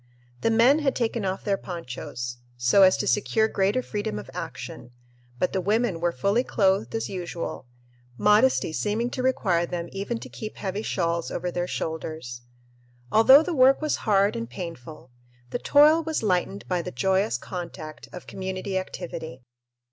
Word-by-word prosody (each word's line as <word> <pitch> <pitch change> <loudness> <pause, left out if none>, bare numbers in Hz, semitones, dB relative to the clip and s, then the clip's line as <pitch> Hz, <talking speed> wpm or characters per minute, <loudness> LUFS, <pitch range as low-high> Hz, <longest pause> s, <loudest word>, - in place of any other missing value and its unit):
The - - +2
men 235 +6 +5
had 280 -3 0
taken 230 -3 -1
off 190 0 -2
their 200 -2 +1
ponchos, 125 -7 -6 0.2
so 125 +11 +4
as 185 -1 +6
to - - -2
secure 220 +2 +2
greater 205 +4 +1
freedom 205 - -3
of 105 - -8
action, - - -7 0.5
but 180 - 0
the 190 - 0
women 210 -1 +1
were 175 +1 +1
fully 200 - +1
clothed 195 -3 +1
as 225 - -2
usual, 175 -7 -5 0.5
modesty 210 -3 +3
seeming 220 +7 -1
to 255 - -3
require 190 -10 +1
them 170 -1 -4
even 200 +4 -3
to - - -8
keep 215 -1 -8
heavy 195 +1 -3
shawls 170 -5 -1
over 180 - -3
their 175 0 -2
shoulders. 155 -8 -5 0.7
Although 265 +7 +8
the 355 - -3
work 265 -1 +5
was 305 -1 0
hard 200 -1 +2
and 115 0 -4
painful, 155 -2 -8 0.4
the - - -2
toil 300 +5 +5
was 320 -5 -2
lightened 195 0 0
by 180 -2 0
the - - -5
joyous 190 - +1
contact 165 -1 -8
of 180 - -9
community 190 0 -3
activity. 160 -8 -7
190 Hz, 165 wpm, -25 LUFS, 170-225 Hz, 0.7 s, Although